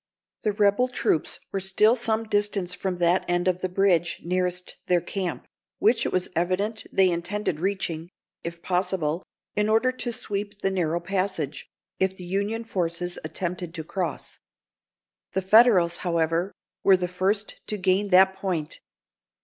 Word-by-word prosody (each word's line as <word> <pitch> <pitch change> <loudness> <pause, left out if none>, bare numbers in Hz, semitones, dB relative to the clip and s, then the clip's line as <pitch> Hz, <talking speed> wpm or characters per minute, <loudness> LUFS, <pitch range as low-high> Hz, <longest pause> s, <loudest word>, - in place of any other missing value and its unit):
The 210 -2 0
rebel 205 +4 +3
troops 210 -10 0
were 195 - -1
still 195 +4 +4
some 225 -2 0
distance 205 -4 0
from 185 0 -2
that 175 +1 +2
end 175 +1 +1
of 180 0 +1
the 185 - -1
bridge 180 -3 +2
nearest 180 0 -1
their 180 -1 +4
camp, 180 +1 -4 0.3
which 230 +2 +3
it - - -3
was 185 -1 +1
evident 185 +6 -1
they 190 -2 +4
intended 175 -1 -2
reaching, 175 -3 -2 0.3
if 170 0 -6
possible, 180 -3 0 0.3
in 210 0 +1
order 225 +4 +3
to 250 -1 -4
sweep 205 -2 -4
the 195 - +2
narrow 170 -3 0
passage, 185 -5 -2 0.3
if 190 0 +1
the 180 - -8
Union 200 +5 -1
forces 175 -4 -2
attempted 175 -1 -4
to 160 - -4
cross. 180 +1 -4 0.9
The 190 +1 0
Federals, 190 -4 +6
however, 170 +1 0 0.3
were 190 -1 +6
the 180 0 -2
first 195 +4 -1
to 210 - -2
gain 190 +1 +2
that 190 0 +6
point. 180 -6 -3
185 Hz, 150 wpm, -25 LUFS, 175-205 Hz, 0.9 s, Federals